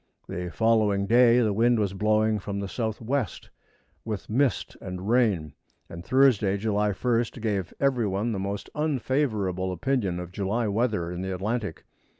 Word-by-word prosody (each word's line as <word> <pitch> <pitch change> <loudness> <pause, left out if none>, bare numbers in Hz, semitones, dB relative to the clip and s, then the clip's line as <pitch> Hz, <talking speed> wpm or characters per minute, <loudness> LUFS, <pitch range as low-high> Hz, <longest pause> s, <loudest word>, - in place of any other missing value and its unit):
The 90 0 -4
following 110 -1 +2
day 120 +2 +5
the 110 -3 +1
wind 120 +3 +3
was 100 -3 0
blowing 110 +1 +2
from 100 +1 -4
the 100 - -3
southwest, 115 +2 -3 0.5
with 110 -2 -5
mist 130 0 +1
and 90 +1 -6
rain, 105 - +2 0.4
and 85 +1 -8
Thursday, 115 -5 +3
July 105 0 0
1st, 120 +3 -1
gave 105 -5 -2
every 130 -5 +2
one 100 +4 -1
the 100 - -2
most 100 +1 -4
unfavorable 125 - -1
opinion 95 -1 -1
of 90 0 -7
July 105 +4 -1
weather 105 -5 0
in 90 0 -5
the 95 0 -3
Atlantic. 105 0 -3
105 Hz, 150 wpm, -26 LUFS, 95-120 Hz, 0.5 s, day